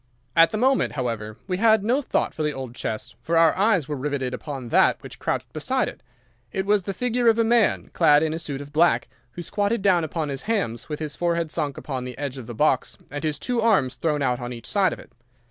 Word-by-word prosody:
"At 165 Hz, 0 st, +7 dB
the 215 Hz, -, -3 dB
moment, 260 Hz, +4 st, +2 dB
however, 115 Hz, -5 st, -3 dB
we 185 Hz, -2 st, -2 dB
had 220 Hz, 0 st, +4 dB
no 250 Hz, +7 st, +2 dB
thought -, -, -1 dB
for -, -, -5 dB
the 150 Hz, -1 st, 0 dB
old 130 Hz, -3 st, -6 dB
chest, 110 Hz, -3 st, -4 dB
for 165 Hz, 0 st, 0 dB
our 165 Hz, -1 st, +5 dB
eyes 190 Hz, -6 st, +2 dB
were 150 Hz, -, -3 dB
riveted 135 Hz, -2 st, -2 dB
upon 130 Hz, -2 st, -6 dB
that -, -, +4 dB
which -, -, -10 dB
crouched -, -, -3 dB
beside -, -, 0 dB
it. -, -, -8 dB, 0.5 s
It 190 Hz, -, -2 dB
was 205 Hz, 0 st, +3 dB
the 195 Hz, +2 st, -4 dB
figure 245 Hz, +2 st, 0 dB
of 225 Hz, 0 st, +5 dB
a 230 Hz, -, +4 dB
man, 230 Hz, -1 st, +2 dB
clad 150 Hz, -3 st, +5 dB
in 155 Hz, -1 st, 0 dB
a 160 Hz, -, -3 dB
suit 145 Hz, -4 st, -5 dB
of 145 Hz, +1 st, -11 dB
black, 170 Hz, +3 st, +3 dB, 0.3 s
who 175 Hz, -, -6 dB
squatted 205 Hz, +3 st, -1 dB
down 180 Hz, -4 st, +4 dB
upon 160 Hz, -1 st, -3 dB
his 135 Hz, -1 st, -4 dB
hams 125 Hz, -, -1 dB
with 150 Hz, -, -4 dB
his 155 Hz, -2 st, -4 dB
forehead 170 Hz, -2 st, 0 dB
sunk 150 Hz, -4 st, -2 dB
upon 130 Hz, -3 st, -4 dB
the 125 Hz, -1 st, -7 dB
edge 140 Hz, -2 st, -4 dB
of 120 Hz, -, -9 dB
the 120 Hz, -, -7 dB
box 135 Hz, +1 st, +1 dB
and 145 Hz, +1 st, -5 dB
his 155 Hz, -2 st, -1 dB
two 240 Hz, +8 st, -1 dB
arms 195 Hz, -, +2 dB
thrown 150 Hz, -3 st, 0 dB
out 125 Hz, -2 st, +1 dB
on 120 Hz, 0 st, -5 dB
each 115 Hz, -1 st, -10 dB
side 195 Hz, -4 st, +2 dB
of -, -, -5 dB
it. -, -, -15 dB
155 Hz, 245 wpm, -24 LUFS, 135-200 Hz, 0.5 s, At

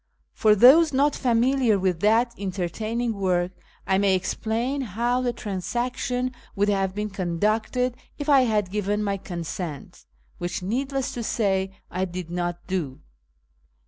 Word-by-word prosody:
For 215 Hz, -1 st, +4 dB
those 285 Hz, +9 st, +7 dB
not 285 Hz, +2 st, +3 dB
familiar 245 Hz, -1 st, +2 dB
with 185 Hz, -3 st, 0 dB
that 225 Hz, +5 st, +3 dB
entertaining 215 Hz, +5 st, -2 dB
work, 185 Hz, -3 st, 0 dB, 0.3 s
I 190 Hz, 0 st, +2 dB
may 195 Hz, -1 st, +3 dB
explain 230 Hz, +8 st, -1 dB
how 240 Hz, +2 st, 0 dB
the 245 Hz, -1 st, 0 dB
transaction 245 Hz, +4 st, -2 dB, 0.2 s
would 205 Hz, 0 st, +2 dB
have 195 Hz, -1 st, 0 dB
been 210 Hz, 0 st, -3 dB
conducted 215 Hz, +7 st, 0 dB, 0.2 s
if 290 Hz, -, -5 dB
I 280 Hz, -3 st, +6 dB
had 210 Hz, -5 st, 0 dB
given 210 Hz, +1 st, -1 dB
my 200 Hz, -1 st, -1 dB
consent 170 Hz, -4 st, -6 dB, 0.3 s
(which, 175 Hz, +2 st, -3 dB
needless 265 Hz, +6 st, -2 dB
to 240 Hz, -, -4 dB
say, 195 Hz, -4 st, 0 dB, 0.2 s
I 185 Hz, +1 st, -1 dB
did 180 Hz, -2 st, -6 dB
not 175 Hz, 0 st, -3 dB
do). 170 Hz, -8 st, -3 dB
210 Hz, 140 wpm, -25 LUFS, 185-245 Hz, 0.3 s, those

